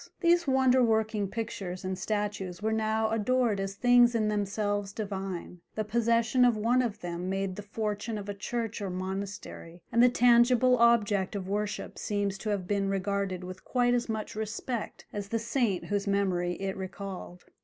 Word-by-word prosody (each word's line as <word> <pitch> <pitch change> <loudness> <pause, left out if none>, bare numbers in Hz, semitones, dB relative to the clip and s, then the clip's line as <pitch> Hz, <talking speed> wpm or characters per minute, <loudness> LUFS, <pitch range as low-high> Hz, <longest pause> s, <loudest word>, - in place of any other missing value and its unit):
These 340 -2 +3
wonder 260 -1 +4
working 220 -2 +1
pictures 190 -4 -5
and 185 0 -1
statues 205 -2 -3
were 220 +1 0
now 220 0 +1
adored 225 -1 +1
as 195 0 -3
things 245 +1 +5
in 215 -2 +2
themselves 205 -1 -1
divine: 195 -4 -5
the 215 - 0
possession 235 +3 +2
of 240 -3 +4
one 235 +4 +3
of 220 -3 -3
them 175 +1 -4
made 195 -1 -2
the 205 - -6
fortune 215 +1 -3
of 205 -1 -6
a 205 - -3
church 225 +2 -4
or 200 - -2
monastery, 185 -2 -6
and 235 - +4
the 250 - +7
tangible 245 +1 +5
object 215 -4 +3
of 190 -2 -4
worship 205 +1 -3
seems 200 -2 -1
to 215 - -4
have 200 -3 -1
been 200 -1 0
regarded 195 -1 -1
with 185 +1 -8
quite 245 -1 +2
as 240 -1 0
much 220 0 -3
respect 220 +2 -4
as 205 -1 -4
the 230 - 0
saint 230 -4 0
whose 205 0 -1
memory 185 -3 +1
it 190 +1 -3
recalled. 190 -1 -7
210 Hz, 175 wpm, -29 LUFS, 195-230 Hz, -, the